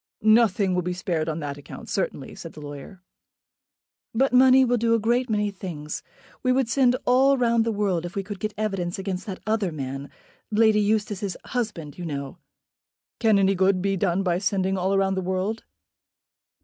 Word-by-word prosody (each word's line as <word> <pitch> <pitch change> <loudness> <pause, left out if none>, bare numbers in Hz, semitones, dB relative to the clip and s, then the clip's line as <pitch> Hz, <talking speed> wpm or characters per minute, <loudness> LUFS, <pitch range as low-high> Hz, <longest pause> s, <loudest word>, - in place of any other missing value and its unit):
"Nothing 215 -3 +4
will 180 - +1
be 180 +1 -2
spared 170 -3 -2
on 160 +1 -3
that 145 -1 -5
account 145 - -10
certainly," - - -3
said - - -9
the - - -11
lawyer. 145 +6 -9 1.1
"But 265 +2 +2
money 260 +1 +7
will 245 0 +2
do 230 0 +2
a - - +1
great 240 +3 +1
many 210 -1 0
things. 165 -6 -6 0.4
We 255 - +2
would 260 -1 +2
send 250 +1 +3
all 265 +2 +4
round 235 -2 +2
the - - +2
world 200 -5 0
if 175 +1 -7
we 195 - -1
could 200 0 -7
get 215 +1 -3
evidence 195 -5 -2
against 190 0 -4
that 190 -2 -6
other 215 -4 0
man, 135 -2 -5 0.4
Lady 215 0 +4
Eustace's 205 -2 -1
husband, 200 - -4
you 175 - -5
know." 140 -3 -5 0.8
"Can 220 -3 +4
any 195 0 +3
good 190 0 +2
be 195 +1 0
done 190 0 0
by 175 -2 +1
sending 190 -1 0
all 190 +1 +1
round 195 0 +1
the 190 - -1
world?" 190 +4 -2
195 Hz, 185 wpm, -25 LUFS, 180-225 Hz, 1.1 s, money